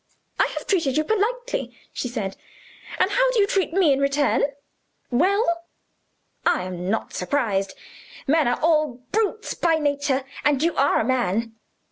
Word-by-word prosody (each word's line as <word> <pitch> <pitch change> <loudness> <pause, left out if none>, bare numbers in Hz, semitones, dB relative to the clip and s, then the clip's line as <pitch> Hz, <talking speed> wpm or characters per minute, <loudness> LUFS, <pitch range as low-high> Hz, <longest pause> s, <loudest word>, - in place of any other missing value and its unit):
"I - - +4
have - - -5
treated 320 -9 +1
you 310 - +3
politely," 475 +6 -1 0.2
she - - -3
said, 210 -6 -4 0.6
"and - - +2
how - - +3
do 470 - +2
you 405 - +5
treat 390 -5 0
me 340 -5 +4
in 270 - 0
return? 280 +1 +2 0.7
Well! 340 - +2 0.8
I - - +2
am 180 0 -5
not 220 - -2
surprised. 195 -3 -1 0.5
Men 305 0 +3
are 245 - +1
all 305 -5 +2
brutes 435 +1 0
by 335 -2 +2
nature 285 -3 0 0.2
and 290 -1 +2
you 335 0 +1
are 280 +1 +3
a - - 0
man. 230 -3 0
290 Hz, 155 wpm, -23 LUFS, 245-365 Hz, 0.8 s, you